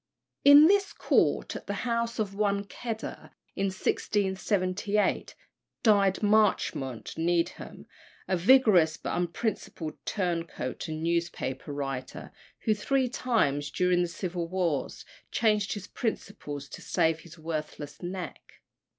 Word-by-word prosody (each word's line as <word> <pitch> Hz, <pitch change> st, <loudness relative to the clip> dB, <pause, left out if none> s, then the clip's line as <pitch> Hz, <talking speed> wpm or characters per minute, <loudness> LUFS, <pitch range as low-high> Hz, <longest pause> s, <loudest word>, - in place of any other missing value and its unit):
In 285 Hz, +2 st, +10 dB
this 395 Hz, +3 st, +3 dB
court, -, -, +1 dB
at -, -, -8 dB
the -, -, -2 dB
house 235 Hz, -1 st, -1 dB
of 210 Hz, -3 st, -1 dB
one 200 Hz, -1 st, +1 dB
Kedder, 220 Hz, +3 st, -7 dB, 0.2 s
in 195 Hz, -, 0 dB
1678, 190 Hz, +1 st, 0 dB, 0.5 s
died 200 Hz, -3 st, +4 dB
Marchmont 205 Hz, -, +1 dB
Needham, 170 Hz, +1 st, -1 dB, 0.4 s
a 185 Hz, -, +1 dB
vigorous 185 Hz, -5 st, +5 dB
but -, -, -3 dB
unprincipled 175 Hz, -2 st, -3 dB
turncoat 170 Hz, -, -2 dB
and 155 Hz, 0 st, -4 dB
newspaper 170 Hz, -5 st, -2 dB
writer, 135 Hz, -2 st, -5 dB, 0.3 s
who 220 Hz, -, +2 dB
three 255 Hz, +5 st, 0 dB
times 145 Hz, -, 0 dB
during 180 Hz, +3 st, +2 dB
the 175 Hz, -, +1 dB
civil 175 Hz, -1 st, -4 dB
wars 175 Hz, -5 st, -2 dB, 0.2 s
changed 210 Hz, -2 st, +1 dB
his 205 Hz, -2 st, -6 dB
principles 150 Hz, -, -4 dB
to -, -, -9 dB
save 160 Hz, 0 st, +1 dB
his 170 Hz, +1 st, -14 dB
worthless 155 Hz, -2 st, -5 dB
neck. 180 Hz, 0 st, -6 dB
185 Hz, 115 wpm, -28 LUFS, 165-210 Hz, 0.5 s, In